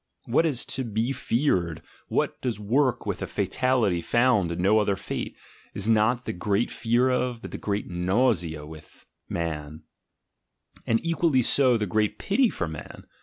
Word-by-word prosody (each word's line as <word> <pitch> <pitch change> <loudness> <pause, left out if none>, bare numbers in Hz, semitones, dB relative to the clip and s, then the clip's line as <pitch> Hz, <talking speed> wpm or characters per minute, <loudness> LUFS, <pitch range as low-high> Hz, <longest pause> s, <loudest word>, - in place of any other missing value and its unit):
What 160 +8 +3
is 135 -6 -1
to 130 - -3
be 115 +2 -1
feared, 90 - 0 0.2
what - - -1
does 120 -5 -2
work 125 +5 +1
with - - -3
a - - -3
fatality 115 -9 +1
found 115 -5 +2
in 85 - -4
no 100 +4 +4
other 100 -2 +1
fate, 95 - -5 0.4
is 100 +1 -3
not 115 +3 +2
the - - -3
great 100 +5 0
fear 120 +2 +2
of, 125 -2 -1
but - - -7
the - - -6
great 105 0 -2
nausea 90 - 0
with, 80 0 -13 0.2
man; 80 -2 -4 1.0
and 115 0 +3
equally 165 -6 +2
so 130 -1 +4
the 105 - -1
great 105 +1 0
pity 240 +5 +2
for 85 - -3
man. 80 -1 -9
110 Hz, 165 wpm, -26 LUFS, 90-125 Hz, 1.0 s, no